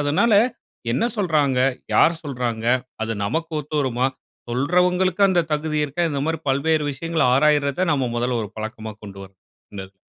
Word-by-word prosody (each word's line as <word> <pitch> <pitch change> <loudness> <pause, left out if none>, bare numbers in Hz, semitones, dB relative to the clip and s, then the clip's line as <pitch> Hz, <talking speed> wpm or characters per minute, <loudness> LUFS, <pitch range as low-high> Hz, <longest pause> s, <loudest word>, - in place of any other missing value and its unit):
அதனால, 150 +11 +2 0.6
என்ன 125 - +1
சொல்றாங்க? 150 -9 +1 0.4
யார் 170 - +5
சொல்றாங்க? 120 -5 -3 0.4
அது, 110 0 -2
நமக்கு 160 +10 -2
ஒத்து 150 +1 -6
வருமா? 130 -1 0 0.4
சொல்றவங்களுக்கு 180 +9 +1
அந்த 175 -3 +2
தகுதி 155 0 -1
இருக்கா? 150 +4 -3
இந்த 140 -2 -2
மாரி, 160 -1 -1
பல்வேறு 150 +3 +1
விஷயங்கள, 165 +3 -2
ஆராய்றத 145 +4 +2
நாம 130 -4 0
மொதல்ல, 120 0 0
ஒரு 105 - -9
பழக்கமா 110 0 -6
கொண்டு 100 -1 -10
வரணும். 95 -1 -19 0.3
இந்த 100 - -6
இதுல. 95 0 -26
145 Hz, 155 wpm, -22 LUFS, 120-160 Hz, 0.6 s, யார்